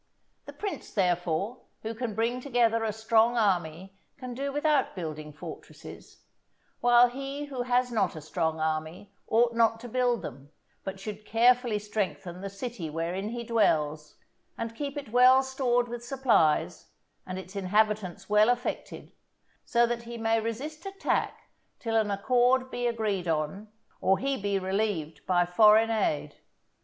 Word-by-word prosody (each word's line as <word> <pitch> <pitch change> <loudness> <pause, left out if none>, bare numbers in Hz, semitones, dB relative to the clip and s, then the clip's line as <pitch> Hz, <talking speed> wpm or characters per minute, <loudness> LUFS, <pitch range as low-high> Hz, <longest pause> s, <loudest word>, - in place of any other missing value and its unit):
The - - -8
prince, 410 -2 -5
therefore, 180 +4 0 0.2
who 220 +1 -3
can 225 -2 -4
bring 235 +3 0
together 235 -4 +2
a 220 - 0
strong 220 +2 +2
army 190 -2 -1 0.2
can 255 -3 -7
do 275 +3 -3
without 295 0 +1
building 155 -4 -6
fortresses, 145 - -11 0.6
while 240 0 +6
he 275 +3 -5
who 270 -3 -5
has 245 0 +1
not 200 -7 0
a 155 - -7
strong 160 +1 -2
army 160 +5 -3
ought 235 +1 +3
not 230 -1 +3
to 245 - -7
build 245 -1 0
them, 140 +3 -8 0.3
but 195 0 -6
should 210 +1 -7
carefully 240 +1 +3
strengthen 200 -4 -4
the 195 - -4
city 195 -4 -6
wherein 170 +6 -3
he 235 +1 -5
dwells, 155 -10 +1 0.4
and 230 0 -4
keep 285 +2 -4
it 280 -5 -6
well 255 +2 +6
stored 250 -2 0
with 240 0 -6
supplies, 240 - +1 0.4
and 185 0 -5
its 190 +1 -9
inhabitants 200 -1 0
well 210 +2 +4
affected, 245 +1 -3 0.5
so 235 0 +3
that 235 0 -2
he 235 0 -8
may 225 0 +1
resist 280 +8 -5
attack 390 0 -2 0.3
till 225 -1 -3
an 220 -2 +2
accord 250 +5 +2
be 245 0 -1
agreed 215 -6 -1
on, 160 +6 -2 0.3
or 190 0 +3
he 275 +7 -1
be 200 -3 -1
relieved 190 -4 -2
by 175 -1 +3
foreign 215 +5 +5
aid. 200 -9 -1
220 Hz, 150 wpm, -28 LUFS, 190-245 Hz, 0.6 s, while